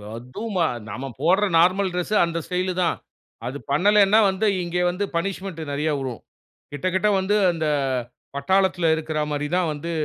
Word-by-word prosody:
அதும் 125 - -7
ம - - +1 0.3
நம்ம 130 +6 -5 0.2
போடுற 190 +6 +3
நார்மல் 185 +3 +3
டிரெஸ் 180 +4 -2
அந்த 170 0 -3
ஸ்டைலு 185 0 -1
தான். 170 - 0 0.5
அது 130 +3 -4
பண்ணலன்னா, 205 +6 +5
வந்து 190 +3 0 0.2
இங்கே 175 +1 -1
வந்து 180 +3 -2
பனிஷ்மென்ட் 185 -1 -3
நெறைய 150 +2 0
வுழும். 130 -4 -5 0.5
கிட்ட 145 +4 -3
கிட்ட 195 +3 +2
வந்து 190 +2 +1 0.2
அந்த 160 -2 -2 0.7
பட்டாளத்துல 185 +2 +2
இருக்கற 155 -1 -3
மாரி 145 0 -2
தான் 180 -3 +1
வந்து 150 +3 -5
175 Hz, 155 wpm, -23 LUFS, 155-190 Hz, 0.7 s, பண்ணலன்னா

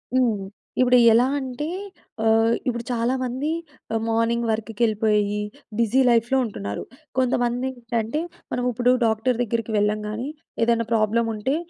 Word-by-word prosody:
హ్మ్. 240 -5 +3 0.4
ఇప్పుడు 250 0 +5 0.2
ఎలా 235 +2 +5
అంటే, 265 +2 -4 0.6
ఆహ్, 225 +1 +4
ఇప్పుడు 235 -1 -1
చాలామంది 255 +3 -1 0.4
ఆహ్, 225 - 0
మార్నింగ్ 230 +1 +1
వర్క్‌‌కెళ్ళిపోయి, 215 -2 +1 0.4
బిజీ 235 +3 +3
లైఫ్‌లో 235 +2 +3
ఉంటున్నారు. 100 - -5 0.3
కొంతమందేంటంటే, 245 0 0 0.3
మనం 245 - -1
ఉప్పుడు 245 +1 +2
డాక్టర్ 225 +2 +1
దగ్గరికి 230 -1 -1
వెళ్ళం 210 +1 +2
గానీ, 225 +5 -4 0.4
ఏదన్నా 230 0 +2
ప్రాబ్లముంటే 225 +3 +1
230 Hz, 115 wpm, -23 LUFS, 220-245 Hz, 0.6 s, ఇప్పుడు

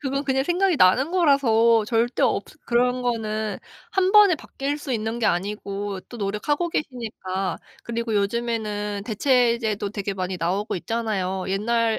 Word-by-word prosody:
그건 275 0 -2
그냥 265 0 +1
생각이 360 +2 +2
나는 260 - +4
거라서 235 - +4
절대 235 +2 0
없 - - +2 0.2
그런 250 +1 +1
거는 220 -3 -2 0.3
1 380 -1 +2
번에 415 -4 +7
바뀔 285 0 -4
수 290 -3 -5
있는 225 +1 -2
게 235 - +1
아니고 200 +1 -2
또 240 - -9
노력하고 225 - -1
계시니까 220 -10 -3 0.2
그리고 235 -1 -3
요즘에는 210 -1 -1
대체제도 230 -3 +1
되게 200 -1 -3
많이 185 0 -3
나오고 190 +5 -1
있잖아요. 190 -3 -2
옛날에 225 +3 +1
225 Hz, 320 characters per minute, -24 LUFS, 205-260 Hz, 0.3 s, 번에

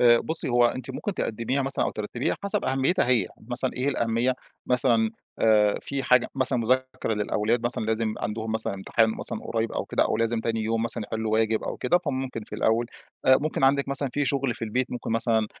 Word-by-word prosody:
آآ 120 -1 +7
بُصّي 160 -3 -3
هو 120 0 +4
أنتِ 130 +1 -4
ممكن 195 +9 -4
تقدّميها 115 +3 -1
مثلًا 135 +1 -1
أو - - 0
ترتّبيها 110 +4 -2
حسَب 200 +1 0
أهميتها 135 +4 +1
هي، 120 -7 +3 0.2
مثلًا 125 +1 -1
إيه 130 +2 0
الأهمية، 120 -1 +1 0.3
مثلًا 115 -3 +3 0.3
آآ 105 -2 +4
في 140 -1 -3
حاجة 125 -2 +4
مثلًا 130 - +1
مذاكرة 130 -1 0
للأولاد 105 +3 0
مثلًا، 120 -2 -1
لازم 110 0 0
عَندهم 110 +2 -3
مثلًا 110 -3 -1
امتحان 110 +3 +1
مثلًا 110 - -5
قريّب 115 0 -2
أو - - -2
كده - - +1
أو - - 0
لازم 115 0 0
تاني 115 -1 -1
يوم 115 +1 0
مثلًا 115 0 +1
يحلّوا 110 0 -3
واجب 110 0 +2
أو - - -4
كده، 175 +8 +2
فممكن 130 -7 -4
في - - -9
الأول. 115 +2 +1 0.4
آآ 130 0 +8
ممكن 150 -2 0
عندِك 140 +1 +3
مثلًا 140 0 -1
في 145 0 0
شُغل 135 -2 0
في - - -11
البيت 125 +3 -1
ممكن 120 -2 -5
مثلًا 115 -1 +2
120 Hz, 205 wpm, -26 LUFS, 110-130 Hz, 0.4 s, آآ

